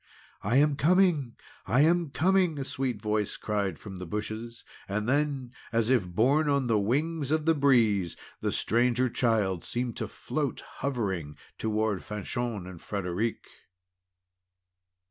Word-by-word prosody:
"I 105 +5 0
am 145 0 +4
coming! 165 -7 +3 0.3
I 120 +8 +4
am 170 +1 +3
coming!" 180 +1 +2
a 140 - -2
sweet 130 -5 -2
voice 105 -1 -1
cried 100 -6 -1
from 95 -3 -9
the 90 -1 -7
bushes. 110 +4 -5 0.3
And 105 +2 -1
then, 140 -2 0 0.2
as 115 +1 +1
if 115 -8 +3
borne 135 - +2
on 140 -2 +2
the 115 -3 +2
wings 145 +7 0
of 155 0 +1
the 165 - +5
breeze, 115 - +3 0.2
the - - -1
Stranger 125 +3 +2
Child 105 -9 +1
seemed 120 -1 -3
to - - -2
float - - -3 0.2
hovering 95 - -2 0.2
toward 110 -3 0
Fanchon 105 0 -3
and 90 -3 -10
Frederic. 100 +3 -2
115 Hz, 140 wpm, -28 LUFS, 105-140 Hz, 0.3 s, the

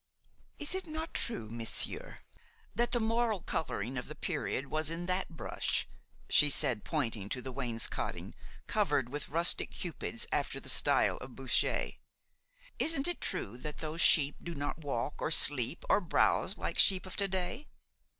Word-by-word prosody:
"Is 295 +3 +4
it 375 -2 -3
not 315 +1 -5
true, 170 - -3
monsieur, 115 -1 -3 0.5
that 240 +1 0
the 240 - +2
moral 225 -3 0
coloring 125 -4 -2
of 125 - -8
the - - -8
period 135 - -3
was 155 +1 -1
in 165 +1 -4
that 185 +1 -1
brush?" 165 - -2 0.4
she 150 - +6
said, 130 -7 +2
pointing 115 -10 -2
to 125 - -3
the 130 +1 -6
wainscoting, 120 -3 -2 0.3
covered 120 - +1
with 145 +2 -5
rustic 170 +3 +3
cupids - - -2
after - - -1
the - - -6
style - - +4
of - - -10
Boucher. - - 0 0.9
"Isn't 310 -2 +3
it 350 - -3
true 115 +5 -3
that 150 +3 -6
those 160 +1 -4
sheep 145 -2 +4
do 170 -1 -6
not 145 +2 -4
walk 140 -3 -3
or - - 0
sleep 145 -3 +4
or - - +4
browse 175 - +1
like - - -2
sheep 190 -2 +6
of 185 - -5
to 200 - +2
day? 190 +9 -3
160 Hz, 160 wpm, -32 LUFS, 130-200 Hz, 0.9 s, she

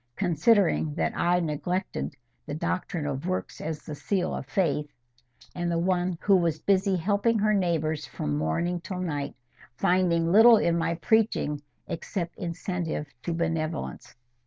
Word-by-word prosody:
considering 175 -3 +2
that - - 0
I 175 +1 +2
neglected 160 - -2 0.3
the 145 - -3
doctrine 165 0 -2
of 145 +3 -3
works 185 0 -3
as 155 -1 -4
the 150 - -7
seal 185 +5 -1
of - - -5
faith, 155 -6 0 0.7
and 175 -1 -2
the 170 - +1
one 180 0 0
who 200 - +5
was 170 -3 +1
busy 195 +2 +2
helping 205 +6 +1
her 215 0 +2
neighbours 160 -5 0
from 75 0 -3
morning 165 - -1
to 185 0 -5
night, 145 -6 -3 0.4
finding 180 -3 +2
little 225 +4 +8
in 170 -4 +2
my 165 0 0
preaching, 180 -6 +1 0.3
except 170 0 -4
incentive 170 -4 -3
to 170 - -3
benevolence. 165 - -3
170 Hz, 145 wpm, -27 LUFS, 155-185 Hz, 0.7 s, little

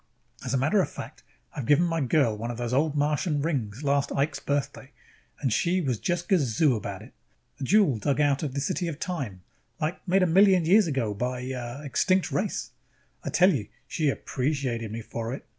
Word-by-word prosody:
As 125 - -3
a 135 - +2
matter 155 +10 +3
of - - -2
fact, - - -9 0.3
I - - -5
have 125 - -4
given 150 +4 +5
my 165 -2 0
girl 130 -4 +2
one 115 +3 -5
of 120 - -5
those 120 0 -3
Old 150 +3 +2
Martian 150 +2 +1
rings 130 -6 -2
last 140 0 +1
Ike's 145 +2 0
Birthday 140 -1 -3 0.5
and 130 -6 0
she 175 +9 +2
was 130 - -1
just 175 0 -2
gazoo 145 - +3
about 110 - -5
it. - - -15 0.5
A - - -4
jewel 180 - +3
dug 140 +7 0
out 145 -2 +2
of 145 -4 -3
the 140 - -1
City 175 +5 -1
of 155 -3 -5
Time, 130 - -4 0.4
like, 155 +4 -2
made 190 +1 +4
a - - +5
million 185 0 +5
years 200 +3 +5
ago 130 -8 -1
by 125 +4 -3
a, 130 +1 -4
uh, 125 +2 -6
extinct 185 +6 +1
race... 200 +1 -2 0.5
I - - -3
tell 185 +2 +5
you, 110 -8 -3 0.2
she 155 -4 0
appreciated 130 -5 -2
me 115 +1 -5
for 115 +3 -4
it!" - - -12
140 Hz, 210 wpm, -27 LUFS, 125-165 Hz, 0.5 s, given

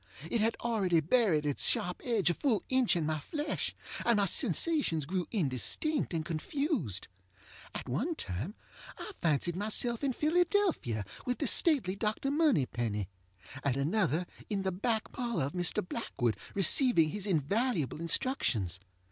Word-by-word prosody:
It 235 - +1
had 225 +2 +1
already 200 -8 +1
buried 165 - +2
its 145 -2 +2
sharp 180 - 0
edge 220 -8 +2
a - - 0
full 230 - 0
inch 260 -5 +3
in 165 -3 0
my 155 0 -1
flesh, 295 - -3 0.3
and 235 -2 +3
my 200 - +3
sensations 200 - +1
grew 180 +3 -2
indistinct 180 - 0
and 160 -3 -2
confused. 165 - -2 0.7
At - - -5
one 260 - -1
time 115 - -4 0.4
I 425 - -7
fancied 165 +2 +1
myself 220 +5 -1
in 270 -2 +1
Philadelphia 325 - +1 0.2
with 250 - 0
the 290 - -2
stately 250 - +4
Dr. 215 +6 -1
Moneypenny, 120 - 0 0.5
at 140 -2 0
another 165 +2 +1 0.2
in 200 -3 -1
the 190 - 0
back 220 +4 -2
parlor 235 - -2
of 140 - -5
Mr. 175 0 0
Blackwood 120 - -2 0.2
receiving 195 - +5
his 205 +2 -3
invaluable 180 - 0
instructions. 140 - 0
195 Hz, 145 wpm, -31 LUFS, 155-250 Hz, 0.7 s, receiving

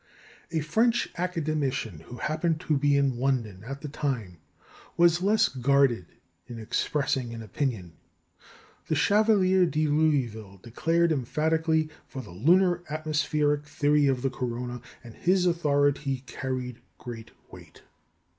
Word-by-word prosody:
" - - -26
A 160 -2 0
French 225 +10 +2
Academician, 155 - -2
who 120 - -9
happened 155 +4 -1
to 155 - 0
be 145 0 +3
in 135 -3 +1
London 115 -8 -1
at 135 +4 -7
the 150 - -5
time, 125 - -3 0.6
was 170 0 +4
less 210 +3 +3
guarded 130 -6 +2 0.4
in 120 - -8
expressing 120 +1 -1
an 115 - -7
opinion. 110 - -3 0.9
The 155 - 0
Chevalier 190 +1 +4
de 155 0 0
Louville 130 -10 0
declared 165 +8 +1
emphatically 160 +3 0 0.2
for 130 - -7
the 105 - -12
lunar 175 - +3
atmospheric 150 -1 0
theory 145 0 +2
of 130 -2 0
the 135 - 0
corona, 125 0 -4 0.2
and 120 -2 -11
his 180 +5 +1
authority 145 -5 +1
carried 125 -2 -5 0.2
great 115 -2 -8 0.2
weight. - - -14
145 Hz, 130 wpm, -27 LUFS, 125-160 Hz, 0.9 s, was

